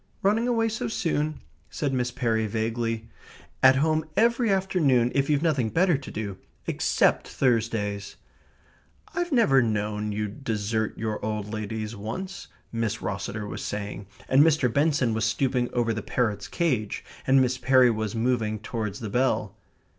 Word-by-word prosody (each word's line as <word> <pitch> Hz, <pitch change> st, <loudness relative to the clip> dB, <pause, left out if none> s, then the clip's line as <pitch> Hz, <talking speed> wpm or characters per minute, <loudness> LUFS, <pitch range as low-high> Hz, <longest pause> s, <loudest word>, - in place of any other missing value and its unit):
"Running 215 Hz, +5 st, +2 dB
away 230 Hz, -2 st, +2 dB
so 225 Hz, 0 st, -2 dB
soon?" 155 Hz, -7 st, -1 dB, 0.3 s
said 140 Hz, -3 st, -2 dB
Miss 125 Hz, -1 st, 0 dB
Perry 115 Hz, -3 st, 0 dB
vaguely. 115 Hz, +1 st, -2 dB, 0.5 s
"At 130 Hz, 0 st, +7 dB
home 155 Hz, +3 st, +2 dB
every 235 Hz, +1 st, +3 dB
afternoon, 160 Hz, -11 st, +2 dB
if 140 Hz, +1 st, +1 dB
you've 150 Hz, 0 st, +2 dB
nothing 140 Hz, -9 st, +1 dB
better 175 Hz, -, +3 dB
to 135 Hz, -1 st, -6 dB
do 100 Hz, -3 st, -5 dB, 0.3 s
except -, -, +2 dB
Thursdays." 110 Hz, -5 st, 0 dB, 1.0 s
"I've 350 Hz, 0 st, -2 dB
never 185 Hz, -, +5 dB
known 105 Hz, -2 st, -1 dB
you 105 Hz, +1 st, -2 dB
desert 110 Hz, -2 st, -2 dB
your 110 Hz, -1 st, -3 dB
old 105 Hz, 0 st, -3 dB
ladies 110 Hz, +1 st, -4 dB
once," 120 Hz, -, -6 dB, 0.2 s
Miss 115 Hz, -2 st, -2 dB
Rosseter 105 Hz, +1 st, -3 dB
was -, -, -6 dB
saying, 100 Hz, -1 st, -5 dB, 0.2 s
and 135 Hz, +2 st, +5 dB
Mr. 145 Hz, -6 st, +3 dB
Benson 140 Hz, -5 st, +2 dB
was 110 Hz, 0 st, -1 dB
stooping 125 Hz, +2 st, +1 dB
over 115 Hz, -2 st, +1 dB
the 110 Hz, -, -3 dB
parrot's 105 Hz, -3 st, -1 dB
cage, 125 Hz, -, -1 dB, 0.2 s
and 135 Hz, 0 st, +6 dB
Miss 130 Hz, 0 st, +1 dB
Perry 130 Hz, -2 st, +5 dB
was 110 Hz, -1 st, -3 dB
moving 115 Hz, -2 st, 0 dB
towards 110 Hz, -1 st, -4 dB
the 110 Hz, -, -4 dB
bell.... 130 Hz, +4 st, +1 dB
120 Hz, 150 wpm, -26 LUFS, 110-145 Hz, 1.0 s, At